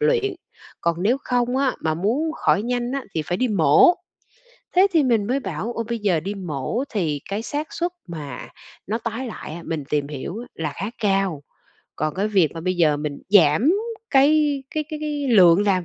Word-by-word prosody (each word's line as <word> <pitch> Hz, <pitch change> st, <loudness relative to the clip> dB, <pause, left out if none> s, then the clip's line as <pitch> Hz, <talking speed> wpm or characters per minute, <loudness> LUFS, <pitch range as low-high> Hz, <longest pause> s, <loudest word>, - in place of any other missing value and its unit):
luyện, 445 Hz, -4 st, +2 dB, 0.5 s
còn 170 Hz, +1 st, 0 dB
nếu 235 Hz, +6 st, +3 dB
không 245 Hz, 0 st, 0 dB
á 270 Hz, -2 st, +2 dB
mà 160 Hz, -1 st, 0 dB
muốn 240 Hz, -, 0 dB
khỏi 205 Hz, -9 st, +1 dB
nhanh 245 Hz, +1 st, -2 dB
á 275 Hz, -1 st, -3 dB
thì 160 Hz, -, 0 dB
phải 175 Hz, +4 st, -2 dB
đi 255 Hz, +3 st, +1 dB
mổ. 190 Hz, -, +5 dB, 0.8 s
Thế 380 Hz, +2 st, +7 dB
thì 320 Hz, -3 st, +4 dB
mình 230 Hz, -6 st, +2 dB
mới 265 Hz, +4 st, 0 dB
bảo 190 Hz, +3 st, -4 dB
"Ô, 230 Hz, -1 st, -3 dB
bây 235 Hz, -1 st, -2 dB
giờ 190 Hz, -7 st, +1 dB
đi 200 Hz, +5 st, -4 dB
mổ 180 Hz, -, -3 dB
thì 155 Hz, -9 st, -1 dB
cái 205 Hz, +3 st, -2 dB
xác 295 Hz, +5 st, -4 dB
suất 350 Hz, +1 st, -2 dB, 0.2 s
mà 150 Hz, -6 st, -7 dB, 0.4 s
nó 220 Hz, +4 st, -1 dB
tái 230 Hz, +3 st, -4 dB
lại 220 Hz, -, -7 dB
á, 170 Hz, -, -8 dB
mình 155 Hz, -4 st, -3 dB
tìm 145 Hz, -1 st, 0 dB
hiểu 150 Hz, +6 st, -6 dB, 0.2 s
là 155 Hz, -3 st, -3 dB
khá 200 Hz, +5 st, -4 dB
cao." 195 Hz, -7 st, 0 dB, 0.5 s
Còn 155 Hz, 0 st, -1 dB
cái 200 Hz, +3 st, 0 dB
việc 190 Hz, -7 st, +3 dB
mà 165 Hz, -, -5 dB
bây 185 Hz, +2 st, -1 dB
giờ 155 Hz, -4 st, +3 dB
mình 145 Hz, -1 st, -4 dB
giảm 200 Hz, -, +5 dB, 0.4 s
cái 285 Hz, 0 st, +4 dB
cái 305 Hz, -1 st, -1 dB
cái 305 Hz, -, -4 dB
cái 295 Hz, -2 st, -2 dB
lượng 190 Hz, -5 st, +6 dB
làm 185 Hz, -4 st, +1 dB
205 Hz, 200 wpm, -22 LUFS, 165-260 Hz, 0.8 s, Thế